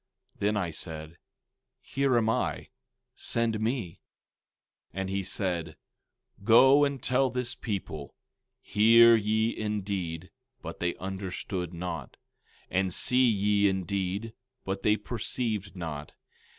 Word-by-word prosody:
Then 105 +1 +1
I 90 -5 -1
said: 80 0 -8 0.6
Here 135 -2 0
am 110 -2 +2
I; 110 - -1 0.4
send 115 -2 0
me. 110 -6 -2 1.0
16:9 - - -3
And 95 0 -2
he 100 0 0
said: 90 -4 -2 0.7
Go 130 +6 +7
and 140 -3 -1
tell 130 +1 +2
this 125 0 -2
people—Hear 105 - +2
ye 110 +1 +1
indeed, 95 -5 -3 0.3
but - - -7
they 90 0 -1
understood 95 -1 -4
not; 85 -6 -6 0.5
and 95 0 +1
see 125 +6 +4
ye 100 -1 +3
indeed, 95 +3 -2 0.3
but 95 0 -3
they 105 0 +3
perceived 110 -2 -3
not. 75 -5 -6
100 Hz, 110 wpm, -28 LUFS, 90-115 Hz, 1.0 s, Go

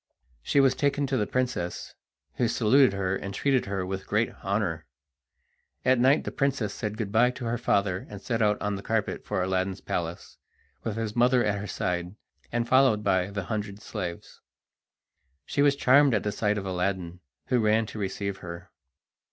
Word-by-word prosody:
She 140 - +2
was 135 -2 +5
taken 140 +1 0
to 135 - -1
the 105 -5 0
princess, 125 -9 -2 0.4
who 120 - +2
saluted 125 +2 +4
her 95 -1 -1
and 100 0 -5
treated 135 -2 +1
her 95 -2 -2
with 95 +1 -5
great - - +1
honour. - - -1 1.0
At 130 -1 +4
night 135 +4 +4
the - - -4
princess 135 -6 0
said 105 0 -4
good 105 -4 -3
bye 115 +3 +4
to 125 0 -6
her 115 0 -1
father, 100 -5 0
and 100 - -8
set 115 +2 -2
out 105 -1 +2
on 105 - -1
the 100 - -6
carpet 110 0 -1
for 90 - -1
Aladdin's 95 +1 -1
palace, 85 0 -4 0.5
with 110 - -3
his 115 -1 -3
mother 125 +1 +4
at 105 -1 0
her 105 - -5
side, 90 0 -2 0.4
and 120 0 -1
followed 130 -5 +4
by 95 -2 +2
the 100 -1 -4
hundred 105 0 -4
slaves. 90 -5 -6 1.0
She 140 - 0
was 140 -1 +4
charmed 140 -1 +5
at 105 - 0
the 105 - -1
sight 105 0 0
of 100 - -4
Aladdin, 90 -1 -2 0.3
who 125 - +3
ran 110 0 +3
to 110 - -8
receive 100 0 -3
her. 85 0 -9
105 Hz, 185 wpm, -27 LUFS, 95-125 Hz, 1.0 s, was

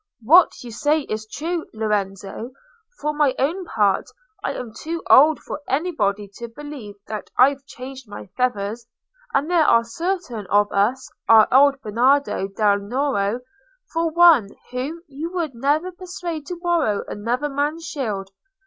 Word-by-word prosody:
"What 330 +6 +5
you 240 - -8
say 295 +7 +1
is 215 -5 -5
true, 330 +7 -4
Lorenzo. 210 +2 -3 0.5
For 300 +1 -1
my 295 -3 +2
own 340 +8 -1
part, 205 - +1 0.3
I - - -1
am 235 -3 -7
too 330 +7 -5
old 305 +3 +7
for - - -7
anybody 220 - 0
to 235 - -6
believe 250 -4 -9
that 215 -2 -6
I've 275 +2 +4
changed 260 -2 -10
my 205 - -8
feathers. 230 -2 -1 0.4
And 280 +2 +1
there 345 -2 +3
are 230 - +5
certain 245 - -4
of 205 +2 +3
us—our 220 0 +3
old 275 +1 +5
Bernardo 245 0 +2
del 205 0 +2
Nero 235 0 -1 0.5
for 330 0 +1
one—whom 315 -1 +2
you 295 +4 -6
would 335 -6 -2
never 290 +9 0
persuade 350 -4 -6
to 360 - -4
borrow 340 - 0
another 245 +7 -2
man's 295 +4 -2
shield. 205 -11 -4
265 Hz, 140 wpm, -22 LUFS, 215-310 Hz, 0.5 s, old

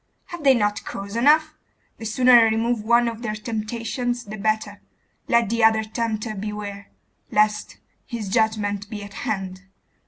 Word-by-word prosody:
Have 345 -4 -7
they 270 -2 +6
not 210 -2 0
cause 200 +2 -7
enough? 305 +5 +4 0.5
The 225 - -7
sooner 250 +3 +3
I 240 -1 +9
remove 225 0 0
one 235 +2 +4
of 230 -1 -4
their 215 -3 -3
temptations 230 +2 -3
the 215 -1 -8
better: 215 -1 -2 0.5
let 235 -2 +3
the 230 0 0
other 220 0 +5
tempter 220 0 -3
beware, 205 -1 -6 0.4
lest 210 0 +1 0.3
his 230 -5 -5
judgment 205 -1 0
be 210 -2 -6
at 200 0 -10
hand! 190 -3 -4
220 Hz, 155 wpm, -23 LUFS, 210-235 Hz, 0.5 s, I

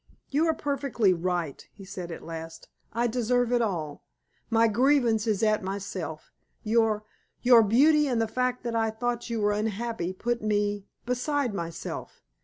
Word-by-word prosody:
"You 305 +4 +2
are 320 - +2
perfectly 275 -9 +1
right," 175 -4 -2
he 195 -1 -11
said 185 -3 -6
at - - -8
last. 165 0 -8 0.2
"I 235 +1 0
deserve 245 +1 +1
it 245 -1 +3
all. 165 -9 -3 0.5
My 230 0 +4
grievance 235 -1 +3
is 215 0 +1
at 215 -1 +3
myself. 190 -5 -5 0.3
Your 220 -1 +2 0.4
your 245 -2 +8
beauty, 290 +8 +4
and 245 -4 +1
the 225 - +1
fact 250 +2 -1
that 235 -1 -2
I 225 -1 +2
thought 240 +2 -3
you 230 -1 -1
were 205 0 +3
unhappy, 215 -2 -2
put 240 +5 -2
me 205 -1 0 0.2
beside 250 0 0
myself. 170 -3 -6
225 Hz, 160 wpm, -27 LUFS, 195-245 Hz, 0.5 s, your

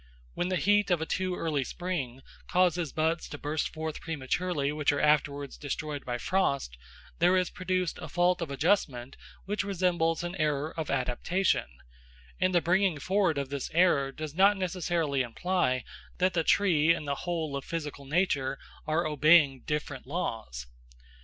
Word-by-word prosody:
When 175 - -1
the 185 - 0
heat 205 +3 +3
of 175 -3 +3
a 160 - -2
too 185 +2 -1
early 155 -6 -1
spring 135 -6 -4 0.2
causes 175 -3 +2
buds 160 +2 -1
to 145 - -6
burst 150 +2 -2
forth 160 -1 -5
prematurely 155 0 -1
which 150 -1 +1
are 145 - -1
afterwards 145 -2 +1
destroyed 150 0 -4
by 120 -1 -2
frost, 140 - 0 0.4
there 180 +2 +4
is 180 -1 0
produced 185 -1 -2
a 155 - -7
fault 175 +2 +2
of 165 - -3
adjustment 140 -4 0 0.3
which 205 +1 -1
resembles 175 -4 0
an 175 0 -4
error 150 -1 0
of 160 -2 -4
adaptation, 140 +8 0 0.7
and 185 0 +2
the 175 - +5
bringing 185 -1 +2
forward 185 -1 +1
of 140 -1 -2
this 140 -1 -4
error 165 -6 +4
does 155 +1 -6
not 195 +4 +5
necessarily 170 -6 0
imply 130 0 0 0.3
that 185 0 +2
the 165 -2 +1
tree 165 -4 +4
and 150 - -7
the 140 - 0 0.2
whole 160 -4 -2
of 140 - -4
physical 150 -3 -5
nature 140 -4 0 0.3
are 160 +2 +1
obeying 150 -2 +4
different 150 -4 -3
laws. 110 - -4
160 Hz, 160 wpm, -29 LUFS, 140-180 Hz, 0.7 s, the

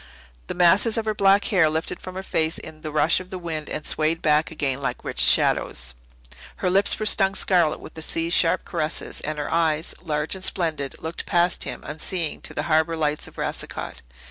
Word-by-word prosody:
The - - -4
masses 190 +6 +4
of 225 - -1
her 215 - 0
black 195 0 +4
hair 180 -8 +3
lifted 160 +3 -2
from 185 0 -8
her 190 - -5
face 160 -3 0
in 155 0 -10
the 155 - -5
rush 155 +3 +3
of 185 0 -10
the 185 - -5
wind 165 -4 -5
and 155 - -5
swayed 160 +1 +1
back 150 0 +2
again 140 -4 -2
like - - -3
rich - - -5
shadows. - - +3 0.6
Her 180 - -1
lips 195 +2 +3
were 215 - -3
stung 195 -2 +4
scarlet 175 -6 +2
with - - -11
the 160 - -8
sea's 165 +1 0
sharp 165 - +3
caresses, 155 +1 -3
and 155 0 -4
her 150 +1 -3
eyes, 160 -1 +1
large 150 -3 -2
and 190 -1 -6
splendid, 160 -8 -2
looked 160 +1 -5
past 175 0 +1
him - - -6
unseeing 155 +2 -3
to - - -5
the 145 - -1
harbour 160 0 +1
lights 150 -1 -1
of - - -16
Racicot. 65 - -4
160 Hz, 205 wpm, -24 LUFS, 155-185 Hz, 0.6 s, masses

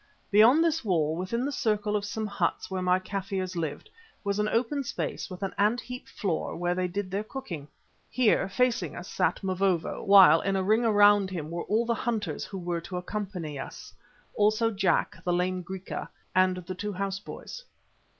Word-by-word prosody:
Beyond 230 +10 +6
this 325 -2 +1
wall, 160 -7 +1
within 205 +8 -2
the 285 - -1
circle 210 -5 0
of 205 -1 -1
some 220 +1 -3
huts 200 -1 -2
where 190 -1 -2
my 180 0 +3
Kaffirs 185 -1 -4
lived, 160 - -4 0.4
was 200 0 -1
an 210 0 +1
open 255 +6 0
space 240 - -4
with 185 +1 -7
an 195 - -2
ant 215 +4 +3
heap 250 +1 -8
floor 180 -6 -2
where 175 +1 0
they 180 0 0
did 185 +1 -4
their 200 +2 -1
cooking. 215 - -7 0.4
Here, 240 -5 +2
facing 250 +4 0
us, - - -7
sat - - 0
Mavovo, 185 -3 0
while 195 -6 +8
in 195 0 0
a 190 - +1
ring 215 +5 +3
around 205 -3 +5
him 165 -4 -5
were 170 0 -4
all 220 +3 +1
the 235 - +1
hunters 230 -1 -2
who 195 - -7
were 175 -2 -3
to 180 +2 -6
accompany 180 -6 -4
us; - - -8 0.4
also 215 +2 +2
Jack, 190 -4 0
the 180 - 0
lame 180 +1 0
Griqua, 190 +1 -6 0.2
and 185 0 +3
the 180 +1 -6
two 205 +3 -4
house 195 0 -2
boys. - - -9
195 Hz, 190 wpm, -28 LUFS, 180-215 Hz, 0.4 s, while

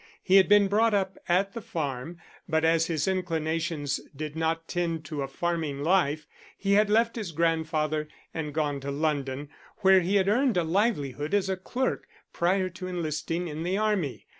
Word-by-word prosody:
He 190 +1 +5
had 195 - +5
been 205 -1 +6
brought 215 +2 +3
up 190 -1 -1
at 195 +3 +2
the 230 - -5
farm, 155 -2 -4 0.3
but 160 0 +2
as 165 0 +3
his 160 -1 -1
inclinations 165 -5 -1 0.2
did 150 +1 -5
not 165 0 -1
tend 165 -3 -2
to 150 -1 -4
a 135 - -2
farming 155 -1 -2
life, 155 -3 +2 0.3
he 200 0 +1
had 210 +1 +4
left 230 +2 +3
his 210 -7 -4
grandfather, 155 -1 0 0.3
and 155 -2 -3
gone 145 -2 -1
to 140 +1 -6
London, 140 -1 -2 0.3
where 190 -1 +7
he 185 +3 0
had 195 -1 +3
earned 245 +1 +2
a 175 - +3
livelihood 160 - 0
as 195 -1 +1
a 190 - +1
clerk 250 +8 -2 0.3
prior 185 +2 +1
to 185 +1 -7
enlisting 165 0 -2
in 155 0 -5
the 180 +3 0
Army. 205 -10 -1
165 Hz, 180 wpm, -27 LUFS, 155-190 Hz, 0.3 s, where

